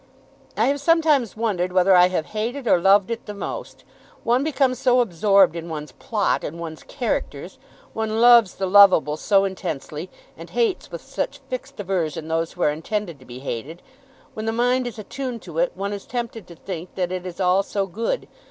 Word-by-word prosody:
"I - - +3
have 280 +1 0
sometimes 300 - +2
wondered 190 -6 -1
whether 185 +1 +4
I 180 0 +7
have 180 -4 -2
hated 240 +5 -3
or 175 - +4
loved 195 +3 +4
it 230 - -5
the 210 - -6
most. 200 - -6 0.4
One 245 +3 +2
becomes 270 -4 +1
so 250 -1 +3
absorbed 195 -4 +4
in 170 0 -6
one's 150 -3 -6
plot 210 - -1
and 165 +3 -6
one's 160 -2 -7
characters! 250 -4 -4 0.3
One 220 0 -2
loves 235 -4 +6
the 195 - -2
loveable 190 -6 +6
so 195 +5 +2
intensely, 170 -3 -5 0.3
and - - -11
hates 450 -6 0
with - - -8
such - - -4
fixed - - -6
aversion 165 -5 -2
those 165 0 -1
who 175 - -3
are 150 - +4
intended 170 +1 -4
to 130 - -16
be 125 +1 -10
hated. 140 +6 -6 0.5
When 220 0 -5
the - - +2
mind 245 +2 +1
is 235 - -7
attuned 245 +3 -6
to - - -5
it, - - +1
one 200 +1 -3
is 200 - -7
tempted 235 -4 -5
to 170 - -12
think 175 0 -7
that 180 -2 -1
it 185 -1 -3
is 175 0 -8
all 185 +1 +3
so 200 0 -2
good. 225 - -3
200 Hz, 195 wpm, -23 LUFS, 175-235 Hz, 0.5 s, I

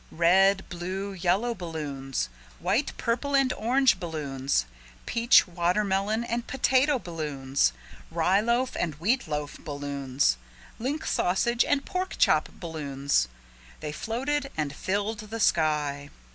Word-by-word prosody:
Red, 190 +4 +4
blue, 185 +3 -4
yellow 190 +6 +1
balloons, 145 - -4 0.3
white, 200 - 0
purple 255 +4 0
and 270 -2 +3
orange 250 -1 +3
balloons 140 - -1 0.4
peach, 235 -1 +5
watermelon 195 +5 0
and 235 0 -3
potato 265 +2 +3
balloons 145 - -1 0.4
rye 170 +4 +2
loaf 240 +3 +1
and 160 -4 -1
wheat 220 - 0
loaf 150 -1 -4
balloons 140 - -1 0.4
link 280 +7 -2
sausage 235 +7 +2
and 285 -1 0
pork 370 0 -3
chop 155 -1 +3
balloons 140 - -1 0.5
they 150 - -4
floated 270 - -2
and 150 -2 -1
filled 205 +6 -2
the 215 +1 -6
sky. 150 -6 +1
185 Hz, 115 wpm, -27 LUFS, 150-235 Hz, 0.5 s, peach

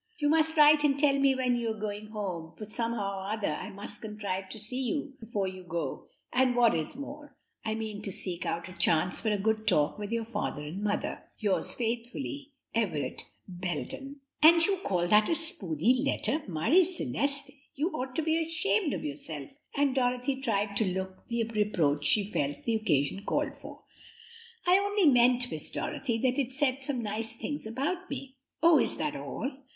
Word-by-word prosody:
"You 295 -1 +1
must 320 +1 +3
write 300 0 +7
and 280 -2 +3
tell 280 -1 +3
me 275 -1 +4
when 250 -1 +1
you 235 -1 -1
are 220 -1 -4
going 210 0 -4
home, 185 -7 -5
for 215 - -7
somehow 215 -3 -2
or 190 +1 -5
other 210 - -1
I - - -5
must 200 +1 -8
contrive 200 -3 -4
to - - -7
see 235 +5 -2
you 275 +2 -2
before 210 -4 -2
you 185 0 -7
go, 170 -1 -4 0.3
and 255 -1 +3
what 240 -2 +5
is 160 +7 -2
more, 285 +2 -9 0.3
I 220 -1 -1
mean 215 -2 -5
to 205 - -3
seek 180 -1 +1
out 170 +1 -3
a 185 - -10
chance 170 0 +3
for 220 - 0
a 210 - +1
good 220 +2 0
talk 150 +7 +3
with 205 +1 -5
your 230 -1 -1
father 190 -9 -3
and 160 +7 -6
mother. 205 -1 -1 0.2
"'Yours 205 -3 0
faithfully, 245 +5 -3 0.2
"'Everett 165 - -1 0.2
Belden.'" 185 - -5 0.2
"And 330 +2 +8
you 395 -1 +1
call 180 - 0
that 210 +3 +5
a 330 - +3
spooney 225 - +1
letter! 295 +2 0
Marie 185 - +4
Celeste, 280 -4 0 0.2
you 300 +6 0
ought 260 -4 -4
to 320 - 0
be 320 +1 +2
ashamed 335 +1 +1
of - - -4
yourself," 145 0 -5 0.2
and 280 -2 +2
Dorothy 250 +1 0
tried 205 -5 0
to 220 - +3
look 190 0 -5
the 235 -1 0
reproach 195 -10 0
she 210 -2 +4
felt 145 -4 -1
the 230 - +1
occasion 195 -4 +1
called - - -1
for. - - -12 0.8
"I 360 +2 +6
only 405 -1 +1
meant, 245 -2 +5
Miss - - +1
Dorothy, 235 -5 -2
that 255 +1 +2
it 260 -1 -4
said 265 -1 +1
some 265 -3 -2
nice 225 +2 -1
things 290 0 -5
about 320 +11 -3
me." 275 -1 -7 0.3
"Oh, 330 -3 +7
is - - +1
that 300 -1 -2
all? 280 -1 -4
230 Hz, 190 wpm, -29 LUFS, 200-280 Hz, 0.8 s, And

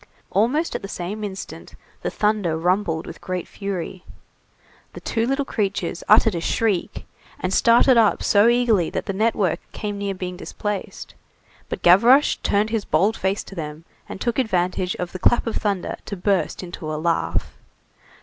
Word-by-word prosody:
Almost 255 - +1
at - - -3
the 195 - -6
same 200 +3 -5
instant, 195 -2 -7 0.3
the - - -2
thunder 210 -6 0
rumbled 175 -1 0
with - - -10
great 185 -2 -4
fury. 190 -2 -5 0.9
The - - -8
two 230 0 -1
little 275 +1 0
creatures 195 -7 -2
uttered 220 0 +6
a 170 - -3
shriek, 205 0 -1 0.3
and 185 +1 -2
started 240 +3 +5
up 220 -3 +3
so 205 +2 +5
eagerly 235 -7 +3
that - - -4
the 195 - -2
network 210 -3 +1
came 205 -2 -4
near 200 -1 -2
being 180 -1 -5
displaced, 205 +1 -5 0.6
but - - -5
Gavroche 235 +11 +6
turned 210 +2 +1
his 225 -3 0
bold 195 +8 +2
face 190 +2 -1
to - - -12
them, 155 -2 -7 0.2
and - - -7
took 235 +4 -1
advantage 185 -5 0
of 180 -1 -4
the 185 - -7
clap 235 - +3
of 230 - -2
thunder 200 -4 -1
to 200 - -5
burst 190 0 0
into 175 -3 -6
a 155 - -2
laugh. 165 +1 -1
200 Hz, 170 wpm, -22 LUFS, 180-220 Hz, 0.9 s, uttered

